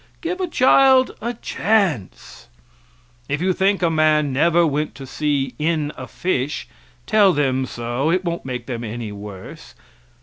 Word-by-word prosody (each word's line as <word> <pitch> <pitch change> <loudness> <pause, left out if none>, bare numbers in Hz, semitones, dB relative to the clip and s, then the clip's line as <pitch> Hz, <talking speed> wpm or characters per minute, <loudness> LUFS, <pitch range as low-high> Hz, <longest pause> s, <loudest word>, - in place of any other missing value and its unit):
Give 360 +2 -3
a 365 - 0
child 265 -3 +4
a 235 +2 -3
chance. 195 - -1 0.8
If 145 - -1
you 185 +2 +1
think 195 +1 +1
a 170 - +3
man 155 -3 +2
never 170 +5 +3
went 150 0 -2
to 135 - -9
sea 135 -1 -1
in 155 -1 0
a - - -8
fish, 145 -7 -2 0.4
tell 205 -3 +4
them 130 -3 0
so, 120 +6 -2
it 185 +2 +1
won't 170 0 -3
make 125 -2 -5
them 120 -2 -5
any 115 -1 -5
worse. 100 -2 -10
150 Hz, 155 wpm, -21 LUFS, 130-185 Hz, 0.8 s, child